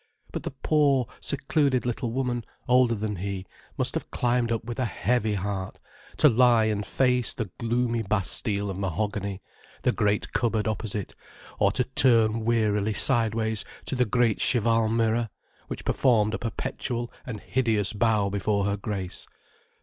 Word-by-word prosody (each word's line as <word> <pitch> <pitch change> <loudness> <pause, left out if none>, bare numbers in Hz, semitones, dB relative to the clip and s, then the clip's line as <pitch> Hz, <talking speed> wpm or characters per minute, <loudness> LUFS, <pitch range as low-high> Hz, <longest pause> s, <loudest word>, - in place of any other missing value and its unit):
But - - -4
the - - -4
poor, 140 -5 +3
secluded 140 -2 0
little 120 -1 -2
woman, 125 -1 -1 0.2
older 125 -2 +4
than 105 -1 -3
he, 95 0 -4 0.3
must - - 0
have - - -4
climbed 120 -1 +1
up 115 -1 -1
with 120 +1 -5
a 130 - +1
heavy 110 +1 0
heart, 95 -1 -3 0.4
to 150 - +6
lie 120 -2 +5
and 105 -1 0
face 125 +1 +1
the 110 -6 -4
gloomy 120 0 0
Bastille 100 0 -1
of 95 - -6
mahogany, 100 +1 -2 0.4
the - - +3
great 105 -1 0
cupboard 110 -3 +1
opposite, 105 -2 -3 0.5
or - - +4
to 125 - +1
turn 115 -4 +3
wearily 110 -2 +1
sideways 110 -3 +1 0.2
to - - -3
the 125 -1 +2
great 115 -1 +2
cheval 115 -1 +3
mirror, 115 0 +1 0.4
which - - -6
performed 110 -5 +3
a - - -2
perpetual 120 +1 -4
and 110 -4 -6
hideous 110 -6 0
bow 105 -2 +2
before 100 0 0
her 100 0 0
grace. 95 -3 -5
115 Hz, 150 wpm, -26 LUFS, 105-120 Hz, 0.5 s, to